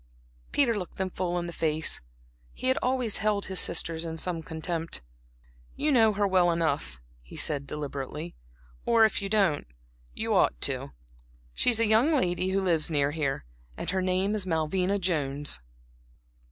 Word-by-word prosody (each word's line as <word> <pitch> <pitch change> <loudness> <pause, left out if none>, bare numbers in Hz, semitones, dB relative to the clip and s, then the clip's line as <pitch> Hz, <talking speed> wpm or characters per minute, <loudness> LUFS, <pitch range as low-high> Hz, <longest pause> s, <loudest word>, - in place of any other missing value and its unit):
Peter 245 -5 +2
looked 185 -4 -6
them 190 -1 -2
full 180 -1 -2
in 175 - -2
the 170 - -6
face; 155 -1 0 0.5
he 255 - -1
had 260 - +3
always 250 -4 +1
held 210 -1 0
his 190 -2 +2
sisters 165 0 +1
in 165 -1 -4
some 165 0 -2
contempt. 160 - -3 0.7
"You 300 +1 +1
know 225 -5 +5
her 205 0 +1
well 185 -2 +3
enough," 155 - -1 0.2
he - - -14
said, 140 -2 0
deliberately 150 +2 -5 0.5
"or 230 -1 +5
if 215 - 0
you 195 - -3
don't 195 - +2 0.5
you - - -1
ought - - +3
to. - - 0 0.6
She's 230 - +3
a 230 - +4
young 225 +8 +4
lady 180 - +1
who 195 +1 +1
lives 170 -5 +2
near 145 -2 +1
here, 140 - -2 0.3
and - - -2
her 190 -1 0
name 185 +2 +1
is 205 -3 -3
Malvina 180 +4 0
Jones." 145 - 0
180 Hz, 165 wpm, -28 LUFS, 155-205 Hz, 0.7 s, know